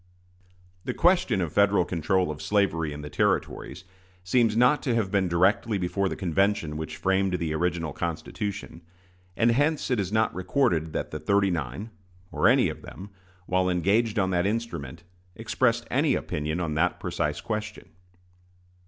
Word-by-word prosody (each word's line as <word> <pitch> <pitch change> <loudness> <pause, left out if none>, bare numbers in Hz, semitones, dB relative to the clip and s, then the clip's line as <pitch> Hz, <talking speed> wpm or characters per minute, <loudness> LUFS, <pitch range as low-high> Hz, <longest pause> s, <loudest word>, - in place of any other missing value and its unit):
The - - -4
question 175 - +3
of 80 -4 -3
Federal 100 -3 +3
control 90 0 0
of 75 - -8
slavery 90 -7 +1
in 75 0 -7
the 75 - -6
Territories 95 - -1 0.4
seems 110 +3 +2
not 125 +5 +4
to 125 -4 0
have 105 -5 0
been 100 -2 +2
directly 95 +5 +2
before 95 +1 -1
the - - -4
convention 95 -3 0
which 80 0 -5
framed 95 +2 +1
the 85 -3 -2
original 85 -2 -1
Constitution; 85 +3 -5 0.6
and 115 +1 +4
hence 145 +3 +1
it 125 - +2
is 95 -1 -2
not 110 +1 +1
recorded 90 - 0
that - - -3
the - - -4
"thirty 100 -1 +2
nine" 85 - -4 0.4
or - - +2
any - - +5
of - - -6
them, 100 +2 -10 0.3
while 90 0 +1
engaged 100 +6 +1
on 95 -2 +1
that 90 +1 +1
instrument, 100 - -4 0.3
expressed - - 0
any - - +2
opinion 75 +3 -3
on 85 -4 -2
that 80 +4 +1
precise 75 0 -2
question. 105 -1 -5
95 Hz, 160 wpm, -26 LUFS, 85-105 Hz, 0.6 s, any